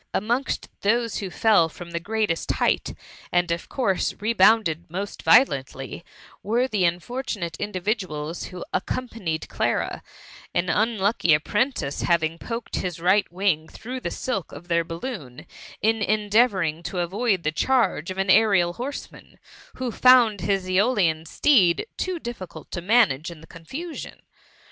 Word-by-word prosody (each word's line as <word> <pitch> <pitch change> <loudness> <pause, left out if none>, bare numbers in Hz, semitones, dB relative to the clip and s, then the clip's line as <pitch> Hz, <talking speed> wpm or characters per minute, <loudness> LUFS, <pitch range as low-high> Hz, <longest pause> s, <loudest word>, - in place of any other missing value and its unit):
Amongst 240 +6 -1
those 230 +1 +1
who 195 - -4
fell 175 0 +3
from 170 +2 -10
the 170 - -2
greatest 210 -2 -1
height, - - 0 0.4
and 175 -1 +2
of 170 0 -3
course 200 -9 0
rebounded 205 -6 +3
most 195 +4 -5
violently, 140 - +2 0.4
were 235 +5 +1
the 210 -7 +1
unfortunate 175 0 -2
individuals 185 -6 -3
who 180 -2 -8
accom 255 +6 -2
panied 165 -8 -3
Clara, - - -1 0.5
an 175 +1 +1
unlucky 205 -6 +2
apprentice 210 - -1
having 165 -1 +1
poked 230 0 -5
his 175 -3 -3
right 185 +4 +2
wing 175 -4 0
through 250 +8 -7
the - - -3
alk 200 - -3
of 170 +5 -11
their 170 0 +2
balloon, 165 - -7 0.4
in 225 0 +2
endeavouring 205 -6 +2
to 180 +2 -5
avoid 190 +2 0
the 155 - +1
charge 195 -4 +1
of 185 - -5
an 195 0 +2
aerial 195 -4 +4
horseman, 265 +8 -8 0.4
who 255 -2 -3
found 240 -4 +5
his 195 -2 0
^olian 185 -5 +1
steed 195 - +3
too 370 -1 -2
difficult 195 - -8
to 175 - -4
manage 175 - +3
in 170 -2 -10
the 160 - -14
confusion. 265 - -8
195 Hz, 140 wpm, -24 LUFS, 170-230 Hz, 0.5 s, found